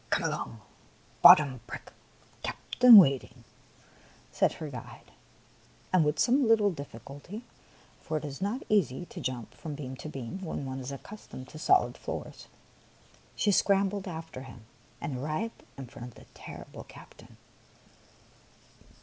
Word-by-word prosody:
*' -, -, -31 dB
Come -, -, +1 dB
along. 115 Hz, -, -3 dB, 0.6 s
Bottom 140 Hz, -4 st, +8 dB
brick. -, -, -9 dB, 0.5 s
Captain 245 Hz, -3 st, +6 dB
wait 140 Hz, -9 st, +7 dB
ing," 120 Hz, 0 st, -17 dB, 0.9 s
said -, -, +2 dB
her 155 Hz, -, -7 dB
guide; 125 Hz, -5 st, -10 dB, 0.8 s
and 180 Hz, -3 st, +5 dB
with 150 Hz, 0 st, 0 dB
some 255 Hz, +1 st, +3 dB
little 215 Hz, -3 st, +4 dB
diffi 140 Hz, -8 st, -8 dB
culty 160 Hz, -, -9 dB, 0.3 s
— -, -, -28 dB
for 155 Hz, -, -2 dB
it 150 Hz, -, -5 dB
is 140 Hz, +3 st, -7 dB
not 210 Hz, +7 st, -2 dB
easy 175 Hz, -, +1 dB
to -, -, -9 dB
jump 130 Hz, -3 st, -4 dB
from 155 Hz, -3 st, -7 dB
beam 130 Hz, -3 st, -6 dB
to 155 Hz, -, -7 dB
beam 135 Hz, +7 st, -6 dB
when 160 Hz, -5 st, -4 dB
one 130 Hz, 0 st, -5 dB
is 130 Hz, +1 st, -6 dB
accustomed 140 Hz, -3 st, -10 dB
to 155 Hz, -, -10 dB
solid 375 Hz, -, +3 dB
floors -, -, -7 dB, 0.4 s
— -, -, -30 dB
she 210 Hz, -, +2 dB
scrambled 195 Hz, 0 st, +2 dB
after 160 Hz, -5 st, -7 dB
him 125 Hz, -4 st, -12 dB, 0.3 s
and 130 Hz, -4 st, -4 dB
arrived 155 Hz, -, -3 dB, 0.2 s
in 135 Hz, -, -6 dB
front 120 Hz, 0 st, -10 dB
of 125 Hz, -, -14 dB
the -, -, -15 dB
terrible -, -, -10 dB
captain. -, -, -15 dB
150 Hz, 155 wpm, -29 LUFS, 130-195 Hz, 0.9 s, Bottom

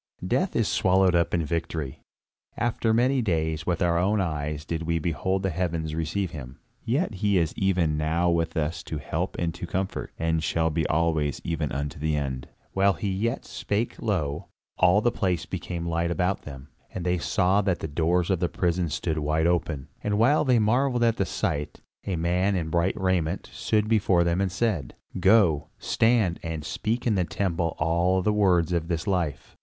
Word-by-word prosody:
Death 130 Hz, -, 0 dB
is 115 Hz, -3 st, +2 dB
swallowed 95 Hz, 0 st, +3 dB
up 85 Hz, -1 st, +2 dB
in 85 Hz, -2 st, 0 dB
victory. 80 Hz, -4 st, -3 dB, 0.6 s
After 115 Hz, -1 st, 0 dB
many 125 Hz, +4 st, +3 dB
days, 80 Hz, -6 st, -1 dB
with 90 Hz, 0 st, +1 dB
our 85 Hz, -1 st, +2 dB
own 100 Hz, +4 st, +2 dB
eyes 75 Hz, -4 st, -2 dB
did 85 Hz, 0 st, -3 dB
we 85 Hz, 0 st, 0 dB
behold 90 Hz, +4 st, -1 dB
the 95 Hz, -, 0 dB
heavens 80 Hz, -2 st, -2 dB
receive 80 Hz, +4 st, -2 dB
him. 65 Hz, -4 st, -8 dB, 0.3 s
Yet 120 Hz, -, -1 dB
is 90 Hz, -6 st, +2 dB
he -, -, -9 dB
even 85 Hz, -5 st, +2 dB
now 80 Hz, +3 st, +1 dB
with 85 Hz, -1 st, 0 dB
us 80 Hz, +1 st, -1 dB
to 80 Hz, -, -4 dB
help 70 Hz, -, -3 dB
and 85 Hz, -1 st, -1 dB
to 90 Hz, -, -6 dB
comfort, 95 Hz, +3 st, -3 dB
and 80 Hz, 0 st, 0 dB
shall 80 Hz, 0 st, +1 dB
be 80 Hz, 0 st, 0 dB
alway 80 Hz, -2 st, +1 dB
even 80 Hz, -3 st, -2 dB
unto 70 Hz, +3 st, -4 dB
the 80 Hz, +1 st, 0 dB
end." 65 Hz, -3 st, -3 dB, 0.3 s
While 100 Hz, +1 st, +3 dB
he 105 Hz, 0 st, -3 dB
yet 115 Hz, +7 st, -1 dB
spake, 105 Hz, +3 st, -3 dB
lo! 85 Hz, -5 st, -1 dB, 0.3 s
all 90 Hz, +3 st, +5 dB
the 120 Hz, -, +2 dB
place 90 Hz, -5 st, -1 dB
became 85 Hz, -2 st, -5 dB
light 85 Hz, 0 st, 0 dB
about 90 Hz, +2 st, 0 dB
them, 70 Hz, -1 st, -9 dB, 0.2 s
and 90 Hz, -, -5 dB
they 90 Hz, 0 st, +1 dB
saw 95 Hz, +4 st, +2 dB
that 95 Hz, -3 st, 0 dB
the -, -, -5 dB
doors 85 Hz, +4 st, +1 dB
of 95 Hz, -, +1 dB
the 90 Hz, -, 0 dB
prison 90 Hz, -1 st, 0 dB
stood 80 Hz, +2 st, -2 dB
wide 75 Hz, +2 st, +1 dB
open; 85 Hz, -5 st, 0 dB, 0.2 s
and 105 Hz, 0 st, 0 dB
while 130 Hz, +8 st, +4 dB
they 130 Hz, -4 st, +3 dB
marvelled 120 Hz, +3 st, +2 dB
at 115 Hz, -1 st, +2 dB
the 95 Hz, -, 0 dB
sight, 75 Hz, -1 st, -2 dB, 0.3 s
a 95 Hz, -, 0 dB
man 90 Hz, +4 st, +1 dB
in 80 Hz, -3 st, -2 dB
bright 85 Hz, +3 st, +1 dB
raiment 95 Hz, -2 st, -1 dB
stood 105 Hz, -1 st, 0 dB
before 100 Hz, -5 st, +3 dB
them 85 Hz, +2 st, +1 dB
and 95 Hz, -2 st, 0 dB
said: 90 Hz, -, -1 dB, 0.2 s
"Go, 90 Hz, -7 st, +4 dB
stand 110 Hz, -7 st, +2 dB
and 80 Hz, -3 st, -5 dB
speak 115 Hz, +9 st, -2 dB
in 115 Hz, -, +3 dB
the 95 Hz, -3 st, +2 dB
temple 85 Hz, -2 st, -1 dB
all 85 Hz, +4 st, +2 dB
the 105 Hz, -, +2 dB
words 90 Hz, -5 st, +3 dB
of 85 Hz, -1 st, -1 dB
this 85 Hz, -2 st, -2 dB
life!" 90 Hz, -7 st, -2 dB
85 Hz, 190 wpm, -26 LUFS, 80-100 Hz, 0.6 s, all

